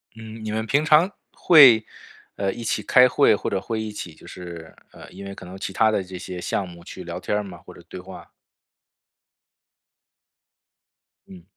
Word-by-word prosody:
嗯， 110 0 -10
你 110 - -4
们 110 +1 -2
平 145 +6 +1
常 155 +5 +4 0.2
会， 130 -10 +7 0.5
呃， 100 -1 -1
一 120 - -8
起 105 -1 -1
开 125 +4 +5
会， 125 -2 +3
或 - - -4
者 95 - -2
会 110 +2 -4
一 110 - -5
起 90 -5 -8
就 - - -18
是 85 -3 -10 0.2
呃， - - -14
因 95 +2 -11
为 100 0 -8
可 95 - -11
能 90 +2 -10
其 95 - -5
他 110 +3 +2
的 100 -3 -1
这 95 0 -9
些 90 0 -7
项 95 +1 -2
目 85 -1 -13
去 - - -10
聊 - - -6
天 105 0 -2
吗， 90 -3 -11
或 - - -13
者 - - -15
对 - - -9
话？ 95 +1 -12 3.0
嗯。 90 -3 -14
100 Hz, 200 characters per minute, -23 LUFS, 90-110 Hz, 3.0 s, 会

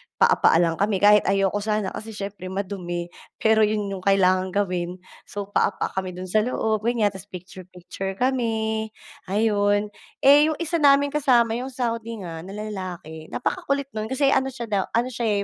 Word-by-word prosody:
paa-paa - - +4
lang 165 -1 -1
kami 200 -1 0
kahit 210 0 +6
ayoko 195 +1 +1
sana 210 -2 -1
kasi 220 0 -8
siyempre 200 -2 -6
madumi, 185 -3 -4 0.2
pero 220 0 +3
'yon 210 -2 +1
'yong 195 - -4
kailangang 185 -1 +3
gawin, 180 -3 -1 0.3
so 205 - -5
paa-paa 200 - 0
kami 185 -1 -6
do'n 185 0 -7
sa 215 - +4
loob, 220 -1 0
ganiyan, 220 -1 +1
'tas 190 +1 -11
picture-picture 185 +1 -8
kami, 220 -3 -1 0.4
ayon. 205 0 +1 0.3
Eh, 290 +3 +7
'yong 315 - 0
isa 335 +1 -1
naming 280 -1 +4
kasama, 250 -6 +3
'yong 255 - -4
Saudi 230 -3 -3
nga 165 -2 -6
na 190 +4 -9
lalaki, 185 -7 -7
napakakulit 275 +2 -2
no'n 215 0 -4
kasi 270 +3 +2
ano 265 0 +2
siya 250 -2 -6
daw 195 -2 +2
ano 245 +2 +1
siya, 220 -4 0
205 Hz, 165 wpm, -24 LUFS, 190-230 Hz, 0.4 s, Eh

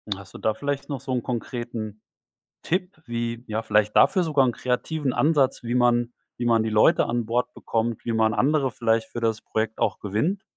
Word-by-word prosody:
Hast 100 0 -13
du - - -8
da 110 - 0
vielleicht 140 +4 -3
noch 140 -4 -4
so 130 - -6
'n 125 -2 0
konkreten 115 -3 -5 0.6
Tipp, 180 -1 -2
wie 120 0 -3
ja, 110 +1 -2
vielleicht 105 -1 +2
dafür 185 - +5
sogar 145 -5 +3
'n 125 - +2
kreativen 130 +3 -2
Ansatz, 145 -5 +2
wie 120 +1 -2
man 120 -1 +2 0.2
wie 120 - -3
man 115 -2 +3
die 110 - -1
Leute 110 +10 +4
an 120 -1 -1
Bord 120 +2 -1
bekommt, 115 -1 -2
wie 115 - -1
man 110 -1 +2
andere 140 0 +2
vielleicht 115 -1 0
für 120 - -5
das 115 -2 0
Projekt 110 0 -2
auch 105 - 0
gewinnt? 115 - -1
120 Hz, 200 wpm, -25 LUFS, 110-135 Hz, 0.6 s, dafür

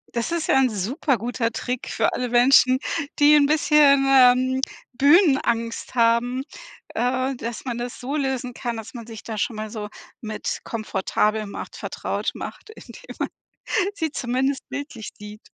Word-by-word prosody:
Das 235 +6 -1
ist 335 -2 -1
ja - - +3
'n 260 -2 +3
super 240 - -1
guter 230 +1 -2
Trick 250 +2 -4
für - - 0
alle 250 -1 -2
Menschen, 255 +1 +5 0.4
die 295 +1 +7
'n 285 -1 +5
bisschen, 295 -3 +5
ähm, 260 0 +5 0.3
Bühnenangst 270 - +2
haben. 240 +2 +2 0.5
Äh, 255 +2 0
dass 235 +1 -6
man 240 -2 -3
das 240 0 -5
so 270 +4 -4
lösen 265 -3 -2
kann, 240 -2 -4
dass 225 +2 -8
man 235 -2 -8
sich 225 -2 -10
da 220 -2 -6
schon 215 +2 -2
mal 215 0 -4
so 210 -1 -6 0.3
mit 215 -1 -4
komfortabel 215 0 -1
macht - - -8
vertraut - - -3
macht, - - -8
indem - - -12
man - - 0 0.7
sie 320 -6 -2
zumindest 265 +2 -1
bildlich 280 -6 -6
sieht. 210 +1 -11
250 Hz, 160 wpm, -23 LUFS, 230-275 Hz, 0.7 s, die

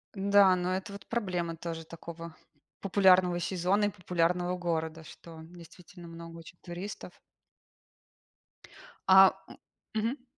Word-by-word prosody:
Да, 200 -1 +5
но 180 0 -1
это 190 +2 -5
вот 200 -1 -11
проблема 180 -7 -2
тоже 165 -1 -6
такого 165 0 -10 0.5
популярного 185 -2 +4
сезона 185 +4 0
и - - +1
популярного 180 -1 -1
города, 160 -2 -3
что, 165 +1 -13
действительно, 175 +2 -14
много 165 0 -10
очень 165 +2 -13
туристов. 180 +4 -8 2.0
А, 190 0 +8 0.2
м - - -13 0.4
мгм. 240 +5 -2
180 Hz, 115 wpm, -29 LUFS, 165-190 Hz, 2.0 s, А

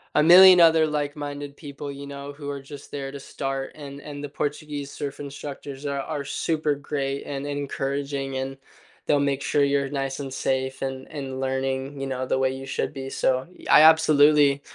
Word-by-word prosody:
a 150 - +5
million 180 +1 +9
other 160 -1 +6
like-minded 145 -1 -4
people, 145 -1 -7
you 140 0 -8
know, 140 0 -7
who 145 0 -8
are 140 -1 -5
just 140 +1 -11
there 135 -1 -5
to 140 - -8
start. 135 0 -4
And 140 -2 -9
and 145 0 -8
the 145 - -5
Portuguese 145 -1 -4
surf 140 -1 -6
instructors 140 0 -7
are 140 -1 -2
are 145 0 -4
super 155 0 -1
great 140 -1 -3
and 140 0 -4
encouraging, 140 -1 -3
and 135 +1 -3 0.5
they'll 145 - +3
make 140 -1 0
sure 145 0 +2
you're 140 -1 +1
nice 135 -1 -3
and 135 -2 -5
safe 130 0 -1
and 130 0 -4
and 135 -3 -6
learning, 135 +1 -2
you 135 - -3
know, 130 -1 -3
the 130 - 0
way 130 0 +2
you 135 0 -7
should 145 - -2
be, 135 -1 -6
so, 130 +2 0 0.2
I - - +8
absolutely 150 -3 +6
140 Hz, 185 wpm, -25 LUFS, 135-145 Hz, 0.5 s, million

